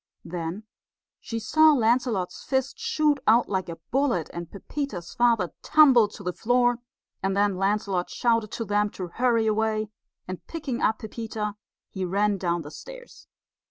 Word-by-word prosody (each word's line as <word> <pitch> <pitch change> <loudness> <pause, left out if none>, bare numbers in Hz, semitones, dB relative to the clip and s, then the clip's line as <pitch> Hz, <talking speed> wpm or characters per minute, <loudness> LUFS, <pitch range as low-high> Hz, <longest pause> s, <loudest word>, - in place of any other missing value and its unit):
Then 170 +4 -5 0.6
she 230 - -5
saw 310 +7 +5
Lancelot's 230 -7 +1
fist 265 - -1
shoot 310 -11 +1
out 230 +3 +5
like 190 -3 -2
a 165 - -5 0.2
bullet, 250 - +1
and 170 -1 -6
Pepita's 200 - -5
father 230 -8 +2
tumble 270 -8 +6
to 205 0 -12
the 180 -1 -2
floor; 245 +2 +2 0.4
and 195 +1 -1
then 205 -1 +2
Lancelot 195 -1 0
shouted 230 -3 +1
to 230 - -3
them 205 0 +1
to 180 -2 -4
hurry 235 +2 +1
away, 215 0 0 0.4
and 185 -1 -6
picking 285 -7 -4
up 220 - +2
Pepita, 220 -1 -5 0.4
he 190 - -4
ran 200 +2 +1
down 170 -2 -1
the 145 - -9
stairs. - - -12
215 Hz, 155 wpm, -26 LUFS, 190-245 Hz, 0.6 s, tumble